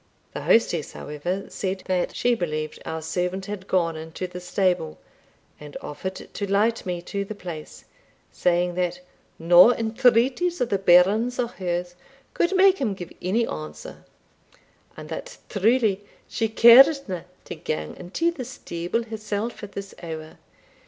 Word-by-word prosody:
The - - -5
hostess, 175 -9 +2
however, 175 +7 -4
said 190 -1 -4
that 185 -1 -1
she 245 - +2
believed 155 -7 -3
our 160 0 -4
servant 180 +4 -2
had 200 -1 -7
gone 170 -3 +1
into 160 +3 -6
the 180 0 -7
stable, 180 - 0 0.6
and 150 -1 -9
offered 185 +6 -6
to 200 +1 -6
light 215 +1 +1
me 175 -1 -3
to 200 +2 -3
the 210 +2 -7
place, 170 -6 -9 0.5
saying 175 0 +1
that 180 0 -2 0.4
"no 175 +7 +7
entreaties 245 +8 +2
of 245 -2 0
the 200 - +1
bairns 195 +7 +4
or 240 -2 0
hers 175 -4 -3 0.4
could 350 +3 +1
make 385 0 +5
him 220 -7 -1
give 175 -3 -9
any 215 +6 +1
answer; 155 -6 -8 0.9
and - - -8
that - - -7
truly 210 -1 +2 0.2
she 225 -1 -1
caredna 235 - +6 0.2
to - - -6
gang 75 0 -4
into 200 - -1
the 300 -7 -6
stable 180 -3 -4
herself 215 0 -4
at 205 -1 -9
this 200 -1 -7
hour. 160 -2 -8
190 Hz, 145 wpm, -24 LUFS, 175-230 Hz, 0.9 s, no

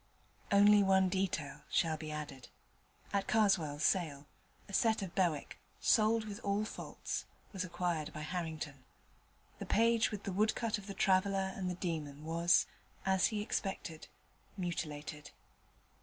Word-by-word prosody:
Only 205 +1 +7
one 190 -1 +4
detail 160 -7 -2
shall 160 -2 +2
be 155 0 -7
added. 145 -4 -6 0.7
At 200 -1 0
Karswell's 170 -9 +2
sale 155 -7 +1 0.4
a 200 - -11
set 220 0 +3
of 180 -3 -6
Bewick, 170 -7 0 0.2
sold 220 0 +3
with 210 0 -6
all 200 0 0
faults, - - -5 0.3
was 190 -2 -2
acquired 175 -3 -2
by 155 - -7
Harrington. 155 -4 -4 0.8
The - - -6
page 230 0 +3
with 205 -2 -6
the 195 - -3
woodcut 215 +2 +1
of 200 - -12
the 200 - -6
traveller 190 0 +2
and 185 -1 -2
the 180 - -3
demon 155 -5 -4
was, 170 +2 +3 0.4
as 190 -1 +4
he 215 - -3
had - - -4
expected, 180 -7 -3 0.5
mutilated. 150 -4 -4
185 Hz, 140 wpm, -34 LUFS, 155-200 Hz, 0.8 s, Only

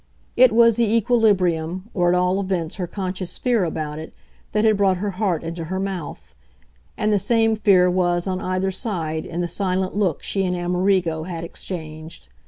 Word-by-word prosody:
It 255 -1 +6
was 230 0 +5
the 230 -3 +2
equilibrium, 190 -5 +1
or 175 -2 +2
at 180 - +3
all 180 +2 +1
events 185 -4 -2
her 180 -3 -3
conscious 185 -1 -4
fear 240 -5 +1
about 155 -2 -3
it, 160 - -9 0.4
that 210 +1 +1
had 215 -1 +4
brought 195 -2 +2
her 200 +2 -2
heart 185 -4 -1
into 165 0 -5
her 185 +3 -3
mouth; 190 -5 -5 0.6
and 215 0 +1
the 205 - +3
same 225 0 +2
fear 195 -4 +4
was, 175 -1 +1
on 185 -1 -2
either 185 +1 -1
side, 165 -7 -3
in 170 +1 -3
the 175 - -1
silent 185 0 -1
look 195 -7 0
she 195 - -1
and 180 -1 0
Amerigo 175 -2 0
had 170 -2 -5
exchanged. 160 - -8
185 Hz, 185 wpm, -22 LUFS, 170-205 Hz, 0.6 s, It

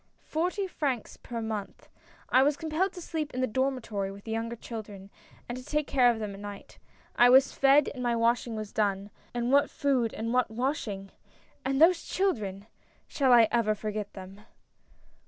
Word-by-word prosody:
"Forty 360 +5 -1
francs 275 - -3
per 230 -2 -6
month. 215 -2 -5 0.4
I 255 - +5
was 285 +1 +2
compelled 325 +4 -1
to 360 - -8
sleep 310 -5 -4
in 255 - -1
the - - +3
dormitory 240 -6 -2
with 200 0 -11
the 225 - -6
younger 230 +1 -2
children, 205 -4 -9 0.4
and 240 - -4
to 255 - -8
take 300 +2 -1
care 255 -4 +4
of 235 - +1
them 210 -2 -4
at 195 - -10
night. 205 -1 -9 0.4
I 245 - +6
was 265 +2 +6
fed 275 +1 +5
and 255 - -7
my 240 -1 +1
washing 230 0 +1
was 215 -1 -6
done 200 -1 -1
— - - -32
and 240 +1 0
what 280 +1 +4
food 255 -5 0
and 230 +2 -3
what 250 -2 +2
washing! 220 -5 -3 0.5
and 270 +1 0
those 335 +2 +5
children 210 - -2 0.2
— - - -36
shall 270 -3 +1
I 235 -2 +7
ever 220 -3 +2
forget 210 -1 -4
them 190 +1 -10
240 Hz, 190 wpm, -28 LUFS, 215-275 Hz, 0.5 s, I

